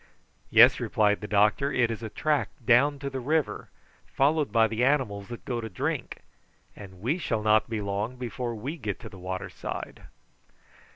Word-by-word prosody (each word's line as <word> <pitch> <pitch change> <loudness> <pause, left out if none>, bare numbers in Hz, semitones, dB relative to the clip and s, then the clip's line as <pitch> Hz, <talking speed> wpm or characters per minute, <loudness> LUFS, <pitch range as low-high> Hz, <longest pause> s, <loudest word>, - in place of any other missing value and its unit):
"Yes," - - +7
replied 105 -1 +1
the 105 - -5
doctor, 105 +7 +2
"it 120 -4 +2
is 115 - -5
a 110 - -5
track 150 +6 0 0.2
down 135 +5 +4
to 140 0 -6
the 135 - -4
river, 150 +3 -1 0.4
followed 145 +2 +1
by 115 -1 +4
the 110 +2 -1
animals 125 -8 +1
that 120 -1 -9
go 120 -2 -2
to 110 - -6
drink, - - -4 0.5
and 95 -3 -12
we 140 - 0
shall 115 -9 -2
not 110 +1 +3
be 110 -2 -2
long 100 +4 -3
before 120 -1 -4
we 135 +10 -5
get 105 - -4
to - - -8
the 95 - -13
water 95 +1 -5
side." - - -7
115 Hz, 180 wpm, -27 LUFS, 105-135 Hz, 0.5 s, Yes